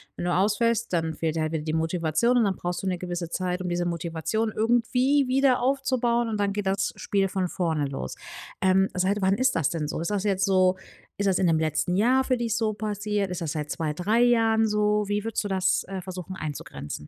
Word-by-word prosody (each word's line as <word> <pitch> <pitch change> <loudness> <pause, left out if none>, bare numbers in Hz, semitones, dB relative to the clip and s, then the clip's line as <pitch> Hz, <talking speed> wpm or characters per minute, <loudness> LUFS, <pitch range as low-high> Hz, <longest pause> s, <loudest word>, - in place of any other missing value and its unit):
wenn - - -4
du 175 - +1
ausfällst, 225 +4 +1
dann 165 -1 0
fehlt 160 0 -2
dir 160 - 0
halt 155 0 -1
wieder 155 - -2
die 155 0 -3
Motivation 165 +8 +1
und 235 - +4
dann 195 - 0
brauchst 175 +1 -4
du 195 - -2
'ne 180 - 0
gewisse 175 -1 -4
Zeit, 180 0 -2
um 180 - -3
diese 175 0 -1
Motivation 170 +6 -2
irgendwie 250 +5 +2
wieder 260 -1 +3
aufzubauen 250 -3 +1
und 215 - -2
dann 200 -1 +1
geht 205 -2 -3
das 195 0 0
Spiel 195 -1 0
von 185 -1 -1
vorne 160 -5 -1
los. 100 - -5 0.5
Ähm, 190 0 +3
seit 195 +2 0
wann 190 +1 +3
ist 260 0 +2
das 160 -5 +1
denn 155 -3 -3
so? - - -4
Ist 170 +5 -2
das 205 -1 -1
jetzt 195 -2 +1
so 185 -1 +3 0.4
ist 200 - 0
das 190 -2 +3
in 185 - +1
dem 160 -2 +3
letzten 160 +3 0
Jahr 255 +6 +3
für 255 -1 0
dich 230 -2 -1
so 220 -2 0
passiert? 210 -1 -2
Ist 180 - -4
das 160 -3 -2
seit 150 -1 -4
2, 155 -2 -2
3 210 +8 +1
Jahren 225 -2 +3
so? 210 0 +1
Wie 205 0 -1
würdest 225 -1 -2
du - - -3
das, 190 -1 +1
äh, 190 -1 -5
versuchen, 185 0 -7
einzugrenzen? 75 - -6
190 Hz, 230 wpm, -26 LUFS, 170-220 Hz, 0.5 s, und